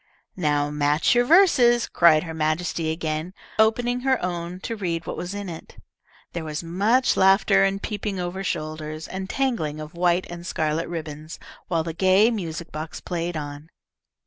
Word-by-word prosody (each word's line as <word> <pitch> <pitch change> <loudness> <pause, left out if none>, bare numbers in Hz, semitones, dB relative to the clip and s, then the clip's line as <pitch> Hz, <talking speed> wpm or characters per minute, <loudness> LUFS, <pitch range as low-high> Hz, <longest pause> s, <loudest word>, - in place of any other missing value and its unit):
"Now 145 -4 0
match 150 +1 +2
your 245 0 +3
verses," 255 -8 +5
cried 160 -3 +5
her 165 -2 -6
Majesty 160 +1 -1
again, 160 +2 -3 0.2
opening 240 +3 +3
her 260 0 +1
own 175 0 -4
to 230 - -4
read 170 -5 -3
what - - -4
was 180 +3 -5
in 205 -1 -5
it. 165 -2 -9 0.6
There 170 - -4
was 155 +1 -4
much 205 +10 +2
laughing 195 +1 +4
and 195 0 +3
peeping 205 -2 -3
over 180 +2 -3
shoulders, 155 -2 -4
and 190 0 -6
tangling 225 - -1
of 155 +2 -8
white 175 +1 +1
and 175 0 -8
scarlet 160 -1 -1
ribbons, 155 -2 -6 0.3
while 165 -2 0
the 165 0 -4
gay 190 +6 +4
music 170 -6 -5
box 155 +1 -6
played 170 -1 -3
on. 145 +1 -7
175 Hz, 165 wpm, -24 LUFS, 155-195 Hz, 0.6 s, verses